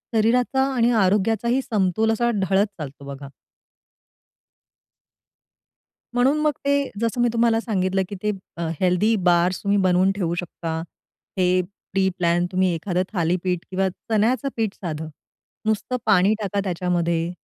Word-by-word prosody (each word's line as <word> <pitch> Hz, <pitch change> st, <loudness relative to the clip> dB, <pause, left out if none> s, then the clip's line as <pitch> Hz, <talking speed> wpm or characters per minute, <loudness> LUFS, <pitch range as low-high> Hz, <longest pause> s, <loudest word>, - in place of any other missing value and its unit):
शरीराचा 245 Hz, +4 st, +2 dB
आणि 240 Hz, -1 st, +3 dB
आरोग्याचाही 225 Hz, +6 st, +1 dB
समतोल 215 Hz, -1 st, +1 dB
असा 235 Hz, +2 st, +1 dB
ढळत 195 Hz, +1 st, +2 dB
चालतो 140 Hz, -1 st, -8 dB
बघा. 140 Hz, 0 st, -8 dB, 2.9 s
म्हणून 260 Hz, +5 st, +3 dB
मग 300 Hz, 0 st, +2 dB
ते 280 Hz, 0 st, +2 dB
जसं 230 Hz, +1 st, 0 dB
मी 240 Hz, -, +3 dB
तुम्हाला 230 Hz, -1 st, +3 dB
सांगितलं, 190 Hz, -4 st, 0 dB
की 205 Hz, -, -5 dB
ते 210 Hz, -, +1 dB, 0.3 s
अ, 170 Hz, -1 st, -2 dB
हेल्थी 185 Hz, +5 st, +2 dB
बार्स 175 Hz, +1 st, +2 dB
तुम्ही 200 Hz, 0 st, +2 dB
बनवून 185 Hz, 0 st, +3 dB
ठेवू 170 Hz, -4 st, -1 dB
शकता. 165 Hz, -2 st, -4 dB, 0.6 s
हे 185 Hz, 0 st, +3 dB, 0.3 s
प्री 190 Hz, 0 st, +2 dB
प्लॅन 175 Hz, 0 st, +2 dB
तुम्ही 185 Hz, -1 st, +2 dB
एखादं 180 Hz, +2 st, -1 dB
थालीपीठ 180 Hz, 0 st, 0 dB
किंवा 190 Hz, +1 st, +1 dB
चण्याचं 225 Hz, +8 st, 0 dB
पीठ 220 Hz, -3 st, 0 dB
साधं, 160 Hz, -3 st, -5 dB, 0.6 s
नुसतं 220 Hz, +3 st, 0 dB
पाणी 200 Hz, -1 st, +4 dB
टाका 200 Hz, 0 st, -1 dB
त्याच्यामध्ये 170 Hz, -2 st, -1 dB
190 Hz, 130 wpm, -23 LUFS, 175-225 Hz, 2.9 s, पाणी